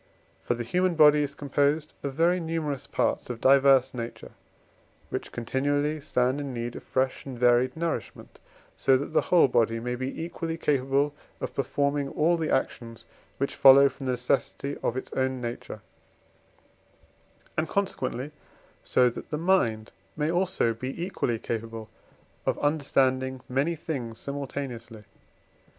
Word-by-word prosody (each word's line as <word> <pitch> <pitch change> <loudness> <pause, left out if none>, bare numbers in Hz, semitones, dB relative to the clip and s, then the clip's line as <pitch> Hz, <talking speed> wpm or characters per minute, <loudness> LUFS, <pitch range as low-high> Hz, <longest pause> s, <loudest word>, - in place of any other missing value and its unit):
For 120 - -1
the 120 - -4
human 180 +8 +1
body 150 -1 +6
is 145 -1 -3
composed 145 +2 0
of 140 -2 -4
very 170 +3 +3
numerous 160 -5 -3
parts, - - -1
of 120 -2 -4
diverse 135 0 +5
nature, 120 -1 -7 0.8
which - - -4
continually 145 +5 -1
stand 130 -1 0
in 135 -3 -5
need 120 0 -4
of - - -7
fresh 130 0 -1
and 130 -3 -7
varied 120 +3 +3
nourishment, 165 0 -4 0.4
so 135 -1 +4
that 145 +4 -5
the - - +4
whole 175 -5 +4
body 115 -2 +2
may 125 +2 -3
be 130 +5 -4
equally 165 -1 -4
capable 140 -1 +1 0.3
of - - -4
performing 140 0 0
all 165 +5 +2
the 160 -2 -2
actions, 115 -3 -2 0.3
which 140 - -1
follow 140 +1 +8
from 135 0 -8
the 130 - +1
necessity 135 +3 -1
of 120 - -1
its 130 - -6
own 130 0 0
nature; 120 -1 -6 1.7
and, 155 0 -1
consequently, 150 -8 -2 0.5
so 125 - +3
that 120 - -5
the 150 - -2
mind 135 -11 +1 0.3
may 155 +1 0
also 175 -9 +1
be 130 +7 -6
equally 170 -9 -1
capable 115 -1 -5 0.6
of - - +1
understanding 130 -3 +1
many 140 +7 0
things 130 -8 -5
simultaneously. 130 -5 -6
135 Hz, 145 wpm, -27 LUFS, 125-150 Hz, 1.7 s, follow